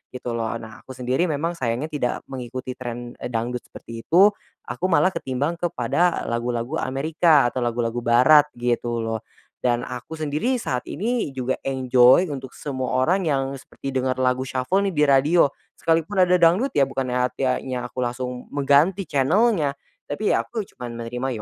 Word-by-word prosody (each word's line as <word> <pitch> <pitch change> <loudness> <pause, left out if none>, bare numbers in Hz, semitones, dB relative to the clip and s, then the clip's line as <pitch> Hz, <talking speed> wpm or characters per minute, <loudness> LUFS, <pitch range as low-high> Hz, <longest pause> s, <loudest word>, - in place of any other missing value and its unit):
gitu 125 -1 -4
loh. 115 -1 -2
Nah, 110 -1 -9
aku 130 - -11
sendiri 130 +8 0
memang 160 +2 -1
sayangnya 125 +5 -2
tidak 130 -5 -1 0.2
mengikuti 130 0 -5
tren, 120 -1 -6
eee, - - -4
dangdut 120 +1 -2
seperti 115 -1 -10
itu, 190 - +5 0.3
aku 185 - -4
malah 175 +2 +3
ketimbang 145 +3 -2
kepada 175 0 0
lagu-lagu 120 +1 -2
Amerika 150 0 +2
atau 130 - -3
lagu-lagu 120 0 -1
barat 125 +6 +5
gitu 120 -1 -1
loh 115 0 -2 0.4
dan 120 -1 +1
aku 125 +5 -7
sendiri 155 - -1
saat 125 -1 -2
ini 215 - -2
juga 130 0 -1
enjoy 130 +5 +4
untuk 135 -2 -7
semua 130 -3 -3
orang 180 +6 +2
yang 135 -2 0
seperti 135 - -8
dengar 130 -1 0
lagu 130 0 0
shuffle 130 +10 0
nih 190 - -2
di 150 - +3
radio, 145 +3 +4 0.3
sekalipun 165 +4 +1
ada 180 0 +4
dangdut 175 +11 +4
ya 135 -2 +3
bukannya 130 -2 -2
artiannya 130 -1 -2
aku - - -27
langsung 125 0 -3
mengganti 145 +8 +3
channel-nya, 155 - +2 0.3
tapi 175 +9 -1
ya - - +1
aku 225 -3 -3
cuman 125 -10 -9
menerima 125 +3 -4
130 Hz, 160 wpm, -23 LUFS, 125-160 Hz, 0.4 s, itu